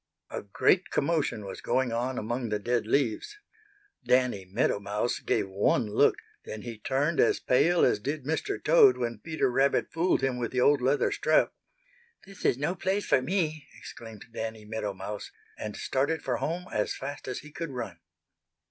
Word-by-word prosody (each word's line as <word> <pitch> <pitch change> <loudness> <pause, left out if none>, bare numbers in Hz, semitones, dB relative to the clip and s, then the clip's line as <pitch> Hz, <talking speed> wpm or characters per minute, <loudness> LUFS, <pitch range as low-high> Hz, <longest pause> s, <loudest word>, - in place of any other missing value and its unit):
A - - -4
great 175 - +2
commotion 145 -8 0
was 95 - -7
going 130 -2 +1
on 125 +3 -1
among 120 +2 -2
the 105 - 0
dead 115 +1 -1
leaves. 135 - 0 0.7
Danny 125 -7 +2
Meadow 100 +2 0
Mouse 105 +4 -2
gave - - 0
one 95 +3 +1
look, - - +4 0.3
then 110 -1 -7
he 115 -3 -7
turned 145 +6 0
as - - +4
pale 165 +7 +3
as - - +2
did 145 +5 -4
Mr. 160 - -1
Toad 440 -6 +6
when 115 -2 -3
Peter 155 +1 -1
Rabbit 135 +2 +2
fooled 170 -1 +1
him 130 -2 0
with 120 - -2
the 125 - 0
old 140 +1 +4
leather 135 +3 +2
strap. - - +2 0.7
"This 195 0 -11
is - - +3
no 145 +6 0
place 190 +2 -1
for 130 - +3
me!" 155 0 -1
exclaimed 115 -4 -10
Danny 110 -2 -5
Meadow 105 -2 -4
Mouse, 100 +2 -6 0.3
and 105 -1 -6
started 145 +5 -1
for 125 -2 -1
home 175 +3 -3
as 105 - 0
fast 140 +1 -7
as 125 - -4
he 150 - -13
could 165 +1 -5
run. 110 -10 -6
130 Hz, 175 wpm, -28 LUFS, 110-150 Hz, 0.7 s, Toad